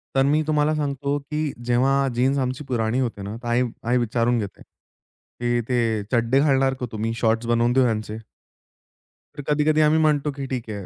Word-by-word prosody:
तर 135 - +4
मी 150 +2 +3
तुम्हाला 150 0 +2
सांगतो, 140 -1 -1
की 150 +1 -3
जेव्हा 135 +3 +2
जीन्स 130 +3 +2
आमची 130 +2 -2
पुराणी 120 -1 0
होते 120 -5 -2
ना 100 +2 -6
तर - - -5
आई 120 +1 +2 0.3
आई 125 +1 +3
विचारून 120 0 +1
घेते, 100 -3 -6
की 120 0 -6
"ते 115 -4 +1
चड्डे 120 +2 +2
घालणार 135 -2 +3
का 125 - -2
तुम्ही? 110 +1 -2
शॉर्ट्स 115 0 +1
बनवून 120 +1 +2
देऊ 130 +1 +4
ह्यांचे?" 110 -2 -2 1.2
तर - - -4
कधी-कधी 150 +1 +3
आम्ही 155 +1 +4
म्हणतो 150 -2 +2
की 140 -1 -5
ठीक 125 -3 -4
आहे 100 -3 -6
125 Hz, 180 wpm, -23 LUFS, 115-140 Hz, 1.2 s, तर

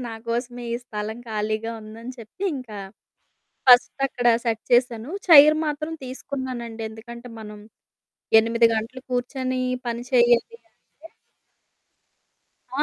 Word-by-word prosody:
నాకోసమే 240 +2 -4
ఈ - - 0
స్థలం 215 0 -5
ఖాళీగా 215 +1 -2
ఉందని 225 +4 -9
చెప్పి, 230 - -12
ఇంకా 225 -6 -8 0.9
ఫస్ట్ 245 0 +7 0.2
అక్కడ 245 -2 -3 0.2
సెట్ 225 -1 0
చేశాను. 240 0 +2 0.2
చైర్ 305 -1 +9
మాత్రం 305 +2 -3
తీసుకున్నానండి. 255 -3 -6
ఎందుకంటే, 235 +2 -10
మనం 210 -1 -10 0.8
8 230 +1 +2
గంటలు 230 +4 -4
కూర్చొని 255 +1 -2 0.3
పని 235 +1 -3
చేయాలి 240 - +3
అంటే 325 +2 -20 1.7
ఆ! - - +4
240 Hz, 110 wpm, -23 LUFS, 225-255 Hz, 1.7 s, చైర్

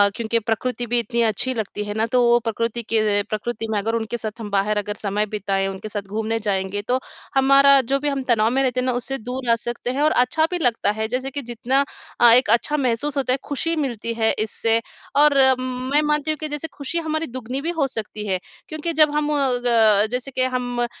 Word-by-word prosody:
क्योंकि 230 0 0
प्रकृति 240 +3 -2
भी 240 +1 +2
इतनी 235 +1 -1
अच्छी 240 +5 0
लगती 210 -3 -4
है 205 0 -5
ना, 220 +1 0
तो 245 +2 +2
वो 240 0 +5
प्रकृति 230 0 -2
के 215 -2 +1
प्रकृति 225 +1 -3
में 215 - 0
अगर 225 +3 -1
उनके 230 +1 -2
साथ 220 0 -6
हम 215 -2 -6
बाहर 200 +2 +1
अगर 210 0 -2
समय 210 0 -1
बिताएँ, 195 -1 0
उनके 195 +2 -6
साथ 205 -1 -3
घूमने 220 +2 -2
जाएँगे 200 -1 -2
तो 255 +1 +1 0.4
हमारा 275 +1 +6
जो 275 0 +2
भी 295 - -1
हम 275 -2 -2
तनाव 225 -3 +2
में 270 +2 +1
रहते 255 -1 0
हैं 250 - -1
ना, 255 - +1
उससे 250 +2 -2
दूर 250 +1 -5
आ - - +5
सकते 240 +1 -4
हैं 270 +3 -2
और 310 +1 +4
अच्छा 250 +6 +2
भी 360 - 0
लगता 235 -7 +1
है। 220 +1 -2
जैसे 255 +3 -3
कि, 285 +1 -4
जितना 245 +3 0 0.4
अ, 240 -1 +8
एक 245 -1 +5
अच्छा 240 +6 +2
महसूस 275 +2 -1
होता 260 -2 +1
है, 265 - +1
खुशी 330 +4 0
मिलती 240 -6 -2
है 225 -1 +2
इससे 225 +1 +1 0.4
और 290 -1 +5 0.2
म 255 0 -4
मैं 295 +1 +4
मानती 300 0 +1
हूँ 310 - -3
कि 310 - -4
जैसे 295 +2 -3
खुशी 285 +4 -4
हमारी 315 0 -2
दुगुनी 255 +1 -5
भी 330 - -3
हो 285 - +2
सकती 215 -3 -6
है। 190 -2 0 0.3
क्योंकि 310 +2 -3
जब 305 -1 +5
हम 300 0 0 0.4
ग 220 -3 +4
जैसे 250 +2 -3
के 255 - 0
हम 250 -1 -2
अ, 240 - +2
240 Hz, 230 wpm, -22 LUFS, 220-270 Hz, 0.4 s, अ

